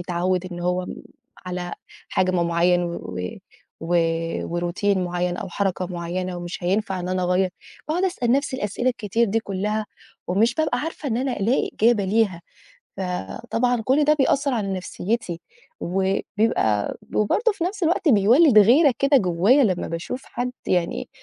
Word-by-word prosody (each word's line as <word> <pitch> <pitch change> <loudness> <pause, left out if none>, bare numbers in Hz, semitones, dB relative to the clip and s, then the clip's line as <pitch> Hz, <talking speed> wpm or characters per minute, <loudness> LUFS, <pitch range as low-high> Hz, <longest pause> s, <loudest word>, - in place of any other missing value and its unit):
اتعوّد 180 +1 -1
إن 175 - -6
هو 180 +1 0
م - - -7 0.5
على 180 -1 -4 0.4
حجم 185 -2 +1
معيّن 175 +1 +3
و 170 0 -4
و - - -5 1.2
و 175 0 -3
وroutine 190 +4 0
معيّن 180 0 -1
أو 190 - -5
حركة 185 -1 -1
معيّنة 180 +1 -4
ومش 175 +1 -6
هينفع 190 0 0
إن 180 - -4
أنا 185 0 -1
أغيّر. 180 +1 +2 0.4
باقعُد 345 +5 +1
أسأل 250 -11 0
نَفْسي 275 -1 0
الأسئلة 210 +4 -1
الكتير 230 -1 0
دي 225 +2 0
كّلها 210 +1 -2 0.4
ومش 220 +7 +2
بابقى 310 -4 0
عارفة 310 -1 -4
إن 225 - 0
أنا 255 +1 -1
ألاقي 230 +7 +1
إجابة 225 -2 +3
ليها، 195 -3 +1 0.5
فطبعًا 230 +6 -2
كل 275 +5 +3
ده 300 +1 +4
بيأثّر 280 -1 +1
على 200 -4 -1
نَفْسيّتي 185 0 -3 0.4
وبيبقى 190 - 0 0.2
وبرضه 430 - +2
في 380 -5 -3
نَفْس 390 +2 -4
الوقت 335 0 +2
بيولِّد 235 +4 +6
غيرة 255 - +6
كده 275 +1 +4
جوّايا 200 +6 +4
لمّا 185 -5 0
باشوف 170 +11 -5
حد 245 +1 -3 0.2
يعني 170 - 0
200 Hz, 155 wpm, -23 LUFS, 180-245 Hz, 1.2 s, بيولِّد